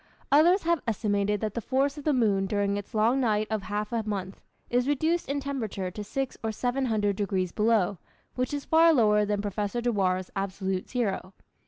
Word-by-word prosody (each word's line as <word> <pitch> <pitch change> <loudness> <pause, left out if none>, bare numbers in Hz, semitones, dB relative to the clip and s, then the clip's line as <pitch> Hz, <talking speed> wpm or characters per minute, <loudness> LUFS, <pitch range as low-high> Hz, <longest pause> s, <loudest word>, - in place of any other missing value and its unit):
Others 340 +7 +5
have 340 -1 +1
estimated 205 -2 0
that 215 -2 -2
the 235 - -3
force 275 +5 0
of 295 - -9
the 305 - +3
moon 205 -7 +2
during 200 0 0
its 205 +3 -6
long 230 +5 +3
night 215 -4 +1
of 215 -2 0
half 210 +1 -3
a 230 - +1
month, 200 -3 -5 0.3
is 245 +1 +1
reduced 315 +3 0
in 285 +1 0
temperature 225 -10 -4
to 210 +3 -6
six 270 +5 -3
or 220 - -1
seven 250 +4 -1
hundred 210 -4 +1
degrees 190 -3 -1
below, 210 -4 +1 0.3
which 255 0 -2
is 290 -1 -4
far 325 +1 +5
lower 210 -4 +4
than 205 0 -1
Professor 205 +3 -2
Dewar's 190 -6 0
absolute 190 -1 -3
zero. 200 -6 -2
215 Hz, 190 wpm, -27 LUFS, 200-260 Hz, 0.3 s, Others